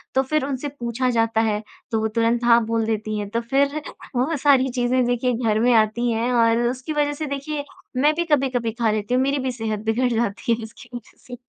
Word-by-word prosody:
तो 265 - +5
फिर 305 +3 0
उनसे 275 0 -3
पूछा 240 +2 -1
जाता 225 -2 +1
है 215 -2 0 0.3
तो 225 - +1
वो 220 - +1
तुरंत 230 +2 0
हाँ 235 -1 +5
बोल 225 0 0
देती 215 -1 -2
हैं, 205 -1 -4
तो 230 +3 -1
फिर 280 +5 0 0.3
वो 265 +7 +1
सारी 270 -2 +4
चीज़ें 250 0 +1
देखिए 245 +1 0
घर 225 -2 0
में 245 +2 +4
आती 225 +2 +2
हैं 230 +2 0
और 230 -1 +4
उसकी 260 +5 -3
वजह 295 -1 +1
से 305 +2 -4
देखिए 285 +1 -4 0.3
मैं 295 +4 +4
भी 340 +1 -1
कभी-कभी 260 -7 +1
खा 230 -1 0
लेती 215 +2 -2
हूँ, 255 - +3
मेरी 275 +1 0
भी 260 -1 -2
सेहत 220 -3 -3
बिगड़ 240 +3 +1
जाती 230 0 -1
है 230 0 -4
उसकी 220 - -12
वजह 240 - -10
से। 250 - -7
240 Hz, 225 wpm, -22 LUFS, 225-265 Hz, 0.3 s, तो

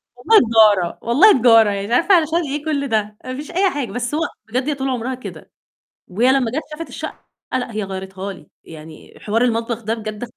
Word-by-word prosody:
والله 445 -1 +5
تجارة، 215 -6 +3
والله 285 - +5
تجارة، 225 -3 +6
يعني 200 0 -3
مش 235 - -3
عارفة 370 +8 +4
علشان 325 0 +2
إيه 295 +2 -4
كُلّ 285 -3 -1
ده، 215 -3 -2
ما 255 - -5
فيش 295 +5 -8
أي 375 +3 +2
حاجة. 275 - -4
بس 245 +4 -3
هو 315 - -1 0.3
بجد 255 +5 -2
هي 295 - -1
طول 270 0 -3
عمرها 255 0 -3
كده، 255 - -11 0.6
وهي 230 +8 +2
لمّا 260 -4 +1
جات 305 +6 -2
شافت 325 +2 -7
الشقة، - - -8 0.3
لأ 245 -2 -2
هي 215 -1 -3
غيّرتها 190 0 -6
لي، 165 -5 -16
يعني 155 -1 -13
حوار 220 +3 -1
المطبخ 235 -1 -1
ده 220 +2 -1
بجد 215 +1 -6
235 Hz, 210 wpm, -19 LUFS, 210-280 Hz, 0.6 s, تجارة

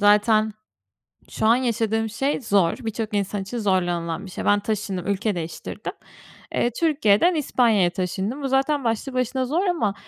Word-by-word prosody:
zaten 215 +1 +4 0.8
şu - - -2
an 225 +2 +6
yaşadığım 225 -3 0
şey 275 +7 -1
zor, 200 -7 +2
birçok 220 -1 -4
insan 200 0 -1
için 200 +6 -5
zorlanılan 175 -5 0
bir 185 - -10
şey. - - -5
Ben 205 0 +4
taşındım, 200 -3 -3
ülke 200 +1 0
değiştirdim. 165 -1 -5 0.6
Eee, 240 - +1
Türkiye'den 310 - +3
İspanya'ya 230 - +3
taşındım. 190 +8 -3
Bu - - 0
zaten 270 +2 +1
başlı 230 +3 -1
başına 255 +1 0
zor 325 +9 0
ama 330 - +1
220 Hz, 155 wpm, -23 LUFS, 200-255 Hz, 0.8 s, an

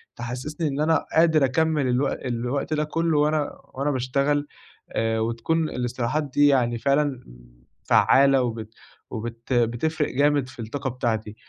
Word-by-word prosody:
تحسسني 130 +7 -4
إن 140 -1 -3
أنا 160 +2 +2
قادر 160 -3 +5
أكمل 150 +1 +1
الو 125 +3 +1
الوقت 125 +4 -3
ده 150 0 +1
كله 165 +1 0
وأنا 150 0 +1 0.2
وأنا 140 +3 -1
باشتغل، 140 +3 0 0.4
آآ 115 0 0
وتكون 120 +8 -1
الاستراحات 125 +4 -2
دي 145 +1 +3
يعني 125 -4 +2
فعلًا 140 0 +1 0.6
فعّالة 135 0 +4
وبت 110 -2 -5 0.4
وبت 115 +2 -5
بتفرق 120 +6 0
جامد 145 -1 +2
في - - -15
الطاقة 130 +5 -4
بتاعتي. 110 -4 -3
135 Hz, 135 wpm, -24 LUFS, 120-150 Hz, 0.6 s, قادر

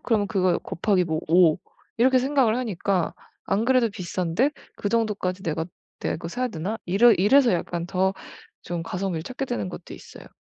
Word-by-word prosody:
그러면 215 -4 +1
그거 185 -3 +2
곱하기 185 +1 0
뭐 160 -2 -2
5 165 -1 +5 0.4
이렇게 255 +2 +5
생각을 260 -3 +2
하니까 195 -6 -1 0.3
안 200 +3 0
그래도 255 -3 +3
비싼데 185 - -1 0.3
그 205 - -2
정도까지 205 -4 -1
'내가 160 -1 -2 0.3
내가 - - -1
그거 165 - -7
사야 250 +7 -2
되나?' 205 +3 -4
이러 210 +7 +6
이래서 235 +6 +4
약간 175 -1 -2
더 190 +1 +1 0.5
좀 170 -1 -4
가성비를 180 -1 -3
찾게 255 +8 -5
되는 105 - -3
것도 - - -9
있어요. - - -13
195 Hz, 355 characters per minute, -24 LUFS, 175-230 Hz, 0.5 s, 이러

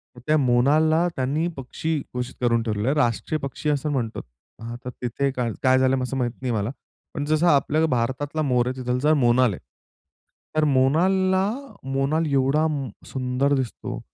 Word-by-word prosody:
तर - - -12
त्या 155 0 +4
मोनालला 150 +6 +3
त्यांनी 140 +6 0
पक्षी 150 +4 -3
घोषित 125 +1 -4
करून 115 -1 +2
ठेवलेलं 105 0 -2
आहे. 145 - +2
राष्ट्रीय 120 +3 0
पक्षी 140 +2 -3
असं 150 +1 0
म्हणतोत. 120 -5 -2 0.4
हां 115 +1 -6
तर - - -3
तिथे 130 +3 -1
का 125 -2 -2 0.2
काय 130 0 +5
झालं? 130 0 +2
असं 135 +1 -3
माहीत 120 -2 0
नाही 125 -2 -1
मला. 105 0 -1 0.4
पण 145 - -3
जसा 155 +1 +3
आपल्या 155 +3 +2
भारतातला 135 +4 -1
मोर 125 -4 +1
आहे, 130 - -2
तिथलचा 125 +5 +1
मोनाल 125 -4 +3
आहे. - - -7 1.0
तर 155 - +3
मोनालला 185 +8 +3 0.5
मोनाल 145 +4 +1
एवढा 140 +3 +2 0.4
सुंदर 130 +2 0
दिसतो 130 -3 -4
135 Hz, 160 wpm, -24 LUFS, 125-155 Hz, 1.0 s, काय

